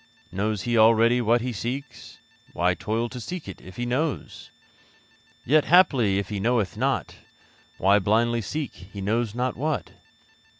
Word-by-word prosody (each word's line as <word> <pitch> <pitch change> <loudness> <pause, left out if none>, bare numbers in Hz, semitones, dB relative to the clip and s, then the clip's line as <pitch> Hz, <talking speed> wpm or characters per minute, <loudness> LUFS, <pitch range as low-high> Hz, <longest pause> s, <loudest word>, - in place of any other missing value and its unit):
Knows 100 +2 -2
he 120 -1 +1
already 115 +2 +5
what 120 +1 +2
he 125 0 -3
seeks? 125 +5 -6 0.4
Why 90 +1 +2
toil 110 +7 -2
to 125 - -8
seek 175 +8 -6
it, - - -9
if 95 0 -12
he 120 - -3
knows? 135 +5 -3 1.0
Yet, 150 +3 +4
haply 135 - +4
if 100 - -3
he 105 -2 -3
knoweth 115 -3 0
not, - - -1 0.6
Why 100 +3 +4
blindly 115 +4 +1
seek 145 +7 -4
he 95 +3 -12
knows 110 +3 -1
not 125 +1 -1
what? 150 +3 -2
115 Hz, 155 wpm, -25 LUFS, 100-125 Hz, 1.0 s, already